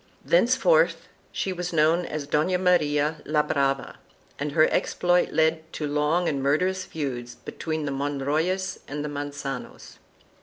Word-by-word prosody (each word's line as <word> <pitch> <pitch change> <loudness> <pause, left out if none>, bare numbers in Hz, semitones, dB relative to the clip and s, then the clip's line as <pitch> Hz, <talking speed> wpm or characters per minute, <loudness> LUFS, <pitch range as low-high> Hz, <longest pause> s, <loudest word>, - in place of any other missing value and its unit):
Thenceforth - - +3 0.2
she 190 - -2
was 180 0 -4
known 165 +2 +2
as 150 -2 -4
Dona 155 +5 +1
Maria 155 -4 +2
la 150 0 +1
Brava, 135 -2 -1 0.4
and 145 0 -3
her 155 0 +5
exploit 175 0 +1
led 160 0 +1
to 150 - -3
long 150 +4 +1
and 140 -3 -1
mur 140 +2 +3
derous 185 +2 -2
feuds 125 -6 -5
between 155 -2 -5
the 140 - -2
Monroyes 145 +7 -1
and 145 +1 -4
the - - -3
Manganos. 145 -2 -6
150 Hz, 145 wpm, -25 LUFS, 145-175 Hz, 0.4 s, her